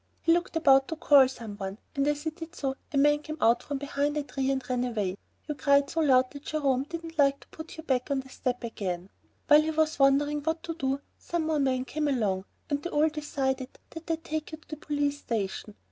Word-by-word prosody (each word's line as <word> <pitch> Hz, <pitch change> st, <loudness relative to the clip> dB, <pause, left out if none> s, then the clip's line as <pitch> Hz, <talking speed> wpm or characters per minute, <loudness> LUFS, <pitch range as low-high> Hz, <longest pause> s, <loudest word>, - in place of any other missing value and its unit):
He 330 Hz, -, +4 dB
looked 345 Hz, 0 st, -1 dB
about 270 Hz, -4 st, +5 dB
to 320 Hz, -, -3 dB
call 285 Hz, -4 st, +6 dB
some 230 Hz, -5 st, -8 dB
one, 195 Hz, 0 st, -5 dB, 0.2 s
and 275 Hz, 0 st, +1 dB
as 295 Hz, 0 st, 0 dB
he 315 Hz, -, -1 dB
did 325 Hz, +1 st, -10 dB
so 270 Hz, -2 st, -2 dB, 0.2 s
a 280 Hz, -, -1 dB
man 295 Hz, +1 st, +5 dB
came 310 Hz, +1 st, -7 dB
out 230 Hz, +1 st, +4 dB
from 285 Hz, -, -4 dB
behind 285 Hz, +1 st, -1 dB
a 295 Hz, -, 0 dB
tree 270 Hz, -1 st, -2 dB
and 265 Hz, -2 st, -1 dB
ran 250 Hz, -1 st, 0 dB
away. 210 Hz, -7 st, -1 dB, 0.3 s
You 300 Hz, -, -1 dB
cried 280 Hz, -1 st, +3 dB
so 330 Hz, -, -1 dB
loud 260 Hz, -4 st, +4 dB
that 285 Hz, 0 st, -10 dB
Jerome 275 Hz, -4 st, +1 dB
didn't 330 Hz, 0 st, -7 dB
like 275 Hz, -1 st, +4 dB
to -, -, -17 dB
put 315 Hz, +1 st, -10 dB
you 320 Hz, -, -7 dB
back 260 Hz, -4 st, 0 dB
on 275 Hz, -1 st, +1 dB
the 265 Hz, -, -16 dB
step 250 Hz, -1 st, -3 dB
again. 190 Hz, -5 st, -4 dB, 0.4 s
While 300 Hz, 0 st, +8 dB
he 310 Hz, -, -1 dB
was 315 Hz, -1 st, +1 dB
wondering 290 Hz, +2 st, +3 dB
what 320 Hz, +2 st, -2 dB
to 335 Hz, -, -3 dB
do, 275 Hz, -3 st, -1 dB, 0.2 s
some 340 Hz, -2 st, -2 dB
more 310 Hz, -1 st, +1 dB
men 260 Hz, -2 st, +1 dB
came 300 Hz, +2 st, -2 dB
along, 205 Hz, -8 st, 0 dB, 0.2 s
and 285 Hz, -1 st, -1 dB
they 350 Hz, -, -4 dB
all 305 Hz, 0 st, +3 dB
decided 270 Hz, -4 st, -3 dB
that 325 Hz, 0 st, -9 dB
they'd 325 Hz, -1 st, -2 dB
take 310 Hz, 0 st, -4 dB
you 315 Hz, -, -6 dB
to 315 Hz, -, -26 dB
the 305 Hz, -, -5 dB
police 290 Hz, -1 st, -1 dB
station. 210 Hz, -1 st, -3 dB
285 Hz, 235 wpm, -28 LUFS, 260-310 Hz, 0.4 s, While